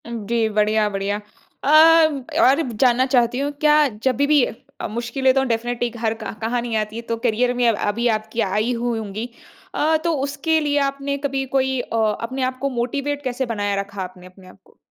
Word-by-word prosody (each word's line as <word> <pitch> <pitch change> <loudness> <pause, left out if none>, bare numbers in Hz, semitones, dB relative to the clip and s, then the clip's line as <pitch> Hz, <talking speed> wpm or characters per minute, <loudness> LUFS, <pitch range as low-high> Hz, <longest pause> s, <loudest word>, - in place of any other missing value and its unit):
जी, 230 0 -1
बढ़िया-बढ़िया। 210 -1 0 0.5
अ, - - 0 0.7
और 275 +1 +5
जानना 245 +3 +3
चाहती 250 -1 +2
हूँ 285 +1 -1
क्या 300 -1 +5 0.2
जब 260 -2 +2
भी 285 +1 +2
भी 295 -3 +4
अ, 225 - -8
मुश्किलें 235 +4 0
तो 270 0 +2
डेफ़िनिटली 240 0 -1
घर 225 -1 -2
का 220 - -4
कहाँ 235 +2 -1
नहीं 235 -1 -3
आती 215 0 -3
है 230 - -4
तो 230 - -1
करियर 245 +2 +2
में 245 -1 +1
अब 230 - +3
अभी 230 +4 0
आपकी 220 +2 -5
आयी 210 +5 0
हुई 235 -1 -1
होंगी। 215 +3 -5 0.5
अ, 315 +1 +2
तो 335 -1 +1
उसके 285 +3 0
लिए 290 -1 0
आपने 280 0 -4
कभी 275 -1 -2
कोई 265 -1 +1
अ, 240 - -5 0.3
अपने 255 +3 -3
आप 255 0 -2
को 275 - 0
मोटिवेट 280 +4 -2
कैसे 255 0 -2
बनाया 205 -4 -2
रखा 200 0 -8
आपने 180 0 -10
अपने 185 0 -16
आपको? 190 +1 -20
240 Hz, 195 wpm, -21 LUFS, 220-270 Hz, 0.7 s, और